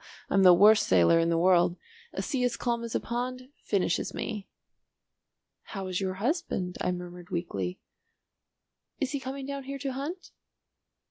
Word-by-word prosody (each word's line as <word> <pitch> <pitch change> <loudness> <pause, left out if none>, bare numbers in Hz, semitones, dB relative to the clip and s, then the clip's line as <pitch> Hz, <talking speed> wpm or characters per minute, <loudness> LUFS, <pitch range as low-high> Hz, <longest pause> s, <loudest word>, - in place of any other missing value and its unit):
I'm 195 - +4
the 185 -1 +9
worst 210 +4 +6
sailor 90 - +5
in 165 0 +2
the 165 - +2
world. 175 0 +4 0.3
A - - -4
sea 265 -4 -1
as 245 -1 0
calm 235 -1 -1
as 230 - -5
a - - +3
pond 255 +2 -4
finishes 190 -4 0
me." 210 -3 -4 1.3
"How 195 - -3
is 185 0 -2
your 190 -1 -2
husband?" 200 - -2
I - - +1
murmured 175 0 -7
weakly. 95 - -3 1.2
"Is 275 - -1
he 285 - -2
coming 265 +1 -6
down 280 -1 -5
here 275 +1 -5
to 275 -1 -3
hunt?" 305 +8 -6
205 Hz, 160 wpm, -28 LUFS, 180-260 Hz, 1.3 s, the